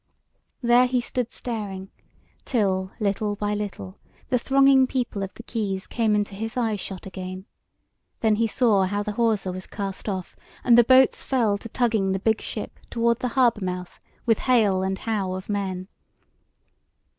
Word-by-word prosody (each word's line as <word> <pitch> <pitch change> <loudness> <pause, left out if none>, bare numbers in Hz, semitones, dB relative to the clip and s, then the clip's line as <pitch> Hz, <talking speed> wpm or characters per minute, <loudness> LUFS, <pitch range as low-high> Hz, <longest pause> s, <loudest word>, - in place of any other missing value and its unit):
There 240 +1 +5
he 250 0 +1
stood 245 0 -3
staring, 200 -5 -5 0.5
till 190 -6 0
little 205 0 0
by 205 0 -2
little 195 - -5 0.3
the 250 - +2
thronging 270 +1 +5
people 245 -6 -2
of 195 -1 -3
the 235 - -10
quays 200 -5 -3
came 225 -3 +1
into 205 -1 -1
his 225 +4 -5
eye 225 -3 +1
shot 190 -2 -6
again; 185 0 -7 0.7
then 220 -2 +3
he 230 +1 +2
saw 215 -4 +3
how 205 +2 -1
the 210 - -3
hawser 210 -4 +1
was 185 +1 -7
cast 200 0 -5
off 185 -3 -4 0.3
and 240 - +6
the 240 - +8
boats 260 +2 +5
fell 235 -6 +1
to 230 - -9
tugging 220 -5 +1
the - - 0
big 220 +2 +1
ship - - -6
toward 235 0 +1
the 255 - -1
harbour 235 -5 +3
mouth 180 -1 -5 0.3
with 225 -2 +3
hale 215 -7 +3
and 190 0 -1
how 200 -4 -2
of 185 +2 -7
men. 190 -3 -2
210 Hz, 170 wpm, -24 LUFS, 190-235 Hz, 0.7 s, the